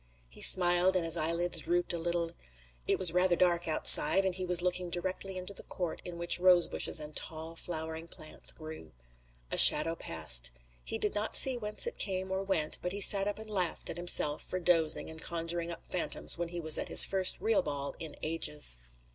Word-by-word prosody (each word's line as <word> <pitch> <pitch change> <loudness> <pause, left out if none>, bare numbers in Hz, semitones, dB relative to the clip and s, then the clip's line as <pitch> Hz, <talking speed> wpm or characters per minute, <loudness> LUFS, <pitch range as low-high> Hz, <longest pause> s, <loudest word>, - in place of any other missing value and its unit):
He - - -14
smiled 180 +1 +4
and 180 -2 -1
his 165 0 0
eyelids 170 +2 0
drooped 175 0 -2
a 170 - -5
little. 170 0 -3 0.6
It - - +1
was 180 -3 +5
rather 180 0 +1
dark 175 -1 -1
outside, 190 +4 +3
and 190 - -2
he 185 0 -6
was 180 -1 0
looking 180 0 -2
directly 185 +2 -4
into 185 +2 -9
the - - -8
court 175 -3 -7
in 175 -1 -10
which 170 +1 0
rosebushes 180 -2 +2
and 150 0 -9
tall 160 +1 -6
flowering 160 -1 -7
plants 155 -2 -5
grew. 155 - -12 0.6
A - - +4
shadow 165 +2 +8
passed. 65 - -1 0.3
He - - -6
did 210 - -3
not 210 +1 -2
see 265 -1 +7
whence 210 -3 +2
it 475 - -6
came 190 -1 -2
or 190 0 -3
went, 190 -6 -2
but 180 - -5
he 200 - -6
sat 200 0 +6
up 205 - -4
and 220 0 -11
laughed 185 -5 -3
at - - -9
himself 175 -4 0
for 185 - -6
dozing 165 -3 0
and 160 0 -10
conjuring 170 0 -5
up 170 - -10
phantoms 180 - -2
when 170 0 -6
he 175 0 -7
was 160 -2 +1
at - - -5
his - - +7
first 190 -1 0
real 220 -1 0
ball 140 -1 -6
in 160 -2 -9
ages. 150 - -3
175 Hz, 205 wpm, -29 LUFS, 160-185 Hz, 0.6 s, shadow